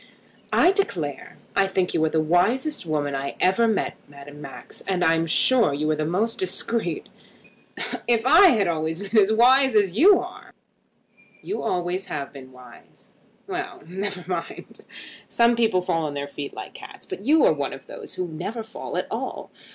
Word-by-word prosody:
"I 360 - +5
declare 175 - -2 0.2
I 195 -1 +3
think 190 -2 -1
you 155 - +1
are - - +1
the 160 - 0
wisest 185 - +1
woman 145 -2 -1
I 135 0 -4
ever 190 +6 +3
met, 220 -2 -1
Madame 145 +1 -12
Max. 135 -2 -8
I 180 -3 +2
am 165 0 0
sure 225 - +4
you 150 +2 -2
are - - +1
the 155 0 -2
most 215 +7 -1
discreet. 185 -1 -1 1.0
If 235 -1 +2
I 325 +9 +8
had 220 - +3
always 160 0 -2
been 205 +3 -6
as 200 +2 +2
wise 255 +3 +5
as 195 -4 +2
you 375 - +6
are!" - - -10 0.9
"You 405 - -4
always 180 +1 -2
have 140 -1 -5
been 130 -2 -12
wise." 125 -1 -17 0.4
"Well, - - -6
never 190 +2 -5
mind. 175 -3 -6 0.5
Some 235 0 +3
people 220 -6 +1
fall 165 -3 -1
on 145 - -6
their 140 0 -4
feet 140 0 -7
like - - -8
cats; - - -12
but 195 - -7
you 310 - +4
are - - +5
one - - -3
of - - -10
those 445 -4 -9
who 180 - -3
never 205 +8 -5
fall 220 +1 -7
at - - -1
all. - - -5
185 Hz, 180 wpm, -24 LUFS, 155-230 Hz, 1.0 s, I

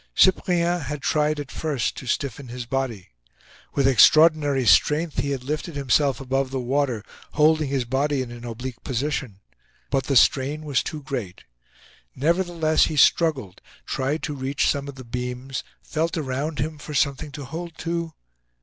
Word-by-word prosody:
Cyprien 175 -2 +3
had 145 0 -5
tried 150 0 +1
at 145 0 -6
first 145 -7 -2
to 130 - -8
stiffen 140 0 -2
his 120 0 -6
body. 120 -7 -3 0.7
With 140 -2 +3
extraordinary 145 0 +5
strength, 150 +7 +3
he 140 - 0
had 135 -3 -3
lifted 150 +4 -4
himself 140 -1 +2
above 135 0 -1
the 135 0 -3
water, 125 -3 0 0.3
holding 155 -1 +3
his 135 -3 -1
body 135 +2 0
in 120 - -9
an 120 0 -9
oblique 120 +1 -7
position. 130 -6 -3 0.5
But 135 -2 +1
the 140 - 0
strain 140 +5 +3
was 140 -4 +1
too 150 -2 -6
great. 125 -9 -5 0.7
Nevertheless, 165 +1 +2
he 155 - -3
struggled, 135 - +3 0.2
tried 135 +4 -2
to 150 - -2
reach 135 0 -1
some 140 0 0
of 140 - -7
the 130 -2 -10
beams, 125 +2 -4 0.2
felt 165 +2 -2
around 145 +1 -3
him 150 +1 -3
for 150 0 -7
something 140 +4 0
to 145 0 -7
hold 165 +4 -7
to. 170 -1 -2
140 Hz, 160 wpm, -24 LUFS, 130-155 Hz, 0.7 s, extraordinary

